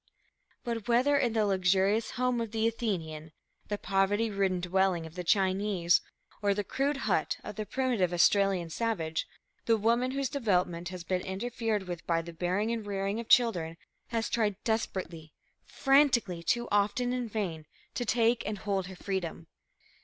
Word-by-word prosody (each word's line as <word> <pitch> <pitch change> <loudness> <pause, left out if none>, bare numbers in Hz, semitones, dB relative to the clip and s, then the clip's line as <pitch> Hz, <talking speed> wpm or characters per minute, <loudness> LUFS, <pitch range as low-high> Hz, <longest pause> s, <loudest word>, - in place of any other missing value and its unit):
But, 230 -4 -4
whether 250 +5 +3
in 245 -5 +2
the 220 -2 +2
luxurious 195 +2 +2
home 250 -1 +1
of 230 - -3
the 225 +1 +1
Athenian, 165 -9 -3 0.3
the 205 - -2
poverty 205 +3 +1
ridden 195 -2 +1
dwelling 180 -1 +1
of 160 - -10
the 180 0 -5
Chinese, 190 -1 +2 0.4
or 200 -1 +2
the 205 - -1
crude 275 +6 -1
hut - - +1
of - - -7
the 215 -1 -4
primitive 245 -9 0
Australian 180 -1 +3
savage, 165 -7 -2 0.4
the 225 -1 +4
woman 235 +4 +2
whose 275 +1 -1
development 180 -9 0
has 180 -2 -7
been 180 +1 -1
interfered 215 +2 -2
with 175 -2 -6
by 165 -1 +1
the 170 0 -9
bearing 185 +6 -1
and 225 -3 -3
rearing 200 +1 -2
of 230 - -7
children 175 -10 +3 0.3
has 230 -2 -1
tried 215 -4 0
desperately, 180 -8 -3 0.3
frantically, 265 - +3
too 235 +8 0
often 210 +5 +1
in 250 -2 -2
vain, 175 -8 -3 0.3
to 245 - -2
take 235 +1 +2
and 210 0 -2
hold 195 -2 -2
her 190 - -9
freedom. 180 -4 -4
205 Hz, 160 wpm, -30 LUFS, 180-230 Hz, 0.4 s, the